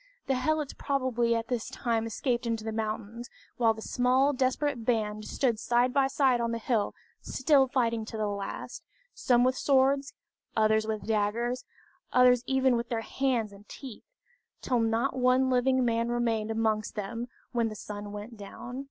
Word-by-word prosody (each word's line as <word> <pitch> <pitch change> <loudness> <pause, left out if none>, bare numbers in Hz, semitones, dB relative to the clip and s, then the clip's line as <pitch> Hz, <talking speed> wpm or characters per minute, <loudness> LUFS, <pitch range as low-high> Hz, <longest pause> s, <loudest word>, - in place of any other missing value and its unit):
The 270 - +1
helots 295 +3 0
probably 250 -4 0
at 230 0 -2
this 245 -2 -2
time 230 -2 -1
escaped 240 +1 -1
into 225 -1 -1
the 220 - -3
mountains; 220 +2 -4 0.3
while 225 -2 +3
the 220 - -8
small 260 +3 +2
desperate 260 0 0
band 215 -3 -1
stood 240 -5 0
side 245 +2 +2
by 275 -1 +3
side 270 -3 +2
on 235 - 0
the 230 - -1
hill 225 -2 -1 0.3
still 270 0 +3
fighting 230 -3 0
to 220 - -7
the 215 - 0
last, 200 -1 -5 0.3
some 245 -1 +3
with 255 +1 +3
swords, 275 +1 +2 0.4
others 220 0 +3
with 215 -1 -3
daggers, 225 +3 0 0.5
others 250 -1 +5
even 265 -1 +3
with 235 0 -2
their 230 -2 -1
hands 235 -3 -1
and 200 +1 -16
teeth, 260 -6 -10 0.5
till 250 -2 0
not 225 +3 +1
one 255 +1 +3
living 255 0 +3
man 230 0 +1
remained 230 -3 0
amongst 220 -1 0
them 230 +3 -4 0.2
when 235 -2 +1
the 215 - -7
sun 205 0 -7
went 210 +3 -8
down. 240 +5 -8
235 Hz, 170 wpm, -29 LUFS, 220-255 Hz, 0.5 s, others